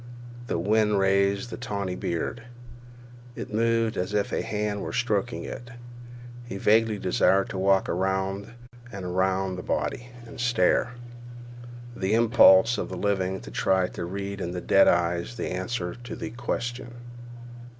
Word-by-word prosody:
The - - -1
wind 105 +3 +2
raised 100 +3 +2
the - - -5
tawny 100 -6 -3
beard. 85 +7 -3 0.9
It - - -7
moved 115 0 +1
as 90 +3 -2
if 100 -1 0
a - - 0
hand 105 -1 -2
were - - -5
stroking 120 -1 -1
it. 120 - -8 0.7
He 120 -5 -7
vaguely 110 +1 +3
desired 95 +1 +2
to 95 - -4
walk 95 0 +3
around 95 +3 -1 0.4
and 100 -4 -7
around 95 +1 0
the - - -5
body 120 +6 -3 0.2
and 125 +3 -11
stare; 120 0 +2 1.0
the 95 +3 0
impulse 115 -2 +6
of - - -3
the 95 - -5
living 95 -1 -1
to - - -10
try 90 +9 +1
to - - -6
read 100 +2 -5
in 90 0 -3
dead 95 - +5
eyes 85 +5 +1
the 115 - -4
answer 90 0 -3
to 120 -1 -8
the 110 - -6
Question. 120 0 -4
100 Hz, 150 wpm, -26 LUFS, 95-115 Hz, 1.0 s, impulse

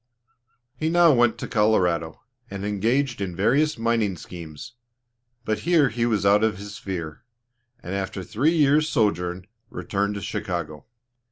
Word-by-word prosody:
He 155 +5 -1
now 170 -2 +5
went 120 -2 +3
to - - -5
Colorado, 90 -8 +1 0.3
and 100 0 -5
engaged 115 +4 0
in 90 -3 -3
various 135 - +2
mining 115 -5 0
schemes, 85 +7 -10 0.7
but 110 -1 -1
here 160 -1 +3
he 115 +1 -1
was 105 -4 0
out 100 +2 +4
of 110 -3 +1
his 100 +1 -8
sphere, 85 -7 -6 0.6
and 90 - -5
after 95 0 -3
a - - -7
three 135 - +1
years' 150 0 +3
sojourn, 90 -4 0 0.2
returned 100 +1 -2
to 100 - -5
Chicago. 90 -7 -4
105 Hz, 150 wpm, -24 LUFS, 95-120 Hz, 0.7 s, now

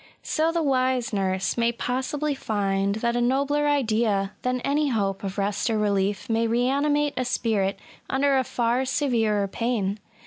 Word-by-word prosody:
So 320 +1 +1
the 335 -1 0
wise 255 -4 +1
nurse 190 +2 0
may 235 0 +3
possibly 265 +5 -2
find 200 -5 -1
that 235 +2 -1
a 240 - +1
nobler 280 +4 +1
idea 220 -8 +1
than 250 0 -1
any 290 +3 +1
hope 200 -5 -1
of 195 0 -4
rest 200 +3 0
or 220 - +1
relief 200 -1 0
may 230 0 +1
reanimate 280 +5 +1
a 255 - +1
spirit 215 -6 0 0.3
imder 275 0 +2
a - - +1
far 240 +1 0
severer 225 -7 +1
pain. 215 -2 -1
235 Hz, 160 wpm, -25 LUFS, 205-270 Hz, 0.3 s, may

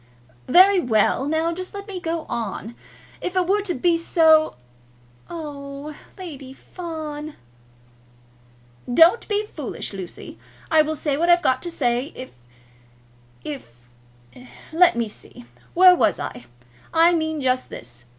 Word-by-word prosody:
"Very 375 +6 +6
well! 245 - +1
Now 320 +2 0
just 370 +3 -7
let 400 +1 -7
me 385 -3 -6
go 330 -1 -3
on. 225 -1 -4 0.5
If 360 - -4
it 370 -1 +2
were 405 +3 +2
to 390 -3 -3
be 335 +5 +2
so 320 -2 +4 0.4
" 120 0 -31
"Oh 290 -3 -7
h, - - -12 0.2
Lady 285 -8 -9
Fawn!" 310 -2 -7 1.6
"Don't 330 - +5
be 420 0 0
foolish, 295 - -6
Lucy. 185 -3 -9 0.3
I 315 -1 +6
will 310 +1 -1
say 290 -2 -1
what 340 +3 +1
I've 345 0 +5
got 260 0 +2
to 350 - -5
say. 250 -2 -1
If 255 - -8 1.1
if 120 - -9 0.8
Let 345 -1 +5
me 235 -1 -1
see. 205 - -11 0.3
Where 365 +1 +8
was - - +2
I? 125 -1 -6 0.5
I 335 +1 +5
mean 315 -2 -1
just 255 -1 0
this. 120 0 -10
310 Hz, 140 wpm, -22 LUFS, 255-345 Hz, 1.6 s, Where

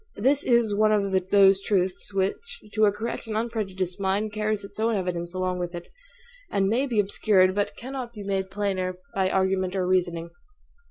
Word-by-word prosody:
This 270 +7 +2
is 235 -3 +3
one 215 +1 +3
of 195 -3 +1
those 195 -1 +6
truths 190 -1 -1
which, 200 - -2
to 215 -1 +4
a 205 - +4
correct 225 +3 -5
and 215 -1 -2
unprejudiced 195 -5 -3
mind, 200 +2 0
carries 215 -1 -1
its 200 - -11
own 225 0 +2
evidence 175 -3 -2
along 185 0 -2
with 175 0 -4
it; 175 - -8 0.6
and 195 -1 +1
may 245 +7 +1
be 230 -5 0
obscured, 195 -2 +3
but 205 +1 -1
cannot 255 -1 -6
be 210 -3 -8
made 195 -1 -2
plainer 190 -2 -2 0.2
by 190 -1 +1
argument 190 0 +1
or 185 -1 0
reasoning. 175 -2 0
195 Hz, 180 wpm, -26 LUFS, 185-215 Hz, 0.6 s, those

